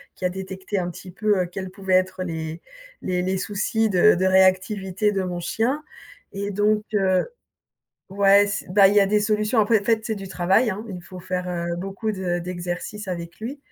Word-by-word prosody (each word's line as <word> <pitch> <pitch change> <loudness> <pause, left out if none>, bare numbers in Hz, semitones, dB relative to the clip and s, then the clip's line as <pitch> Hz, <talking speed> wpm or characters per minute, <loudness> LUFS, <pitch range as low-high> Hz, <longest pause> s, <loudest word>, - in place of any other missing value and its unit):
qui - - -12
a 180 - +3
détecté 190 +1 -4
un 175 0 -2
petit 180 +1 -10
peu, 205 0 +1
heu, - - -3
quels 190 +1 -6
pouvaient 190 -1 -1
être 185 0 +1
les 160 -1 -5 0.4
les 180 -1 -1
les 185 +1 -1
soucis 210 +3 0
de 190 +2 +5
de 185 - 0
réactivité 190 +2 +2
de 195 -2 -1
mon 175 -1 -3
chien. 240 - -1 0.5
Et 200 +1 -3
donc, 210 +2 +2
heu 190 -2 +2 0.9
ouais, 200 +1 +5
c'est 200 -3 -4
bah 195 0 +6
il 200 - +1
y 205 - +6
a 195 - +4
des 210 +1 +2
solutions, 215 +2 +1
après 215 0 +3
en 200 - -11
fait 225 0 +1
c'est 220 - -2
du 195 -1 -7
travail 190 +6 +2
hein? 210 +4 -5
Il 180 - -6
faut 185 +1 -11
faire, 180 0 -3
heu, 170 -1 -2
beaucoup 195 +4 -3
de 180 -3 -2
d'exercices 180 +3 -5
avec 170 +1 -6
lui. 260 +6 -5
190 Hz, 205 wpm, -23 LUFS, 180-210 Hz, 0.9 s, bah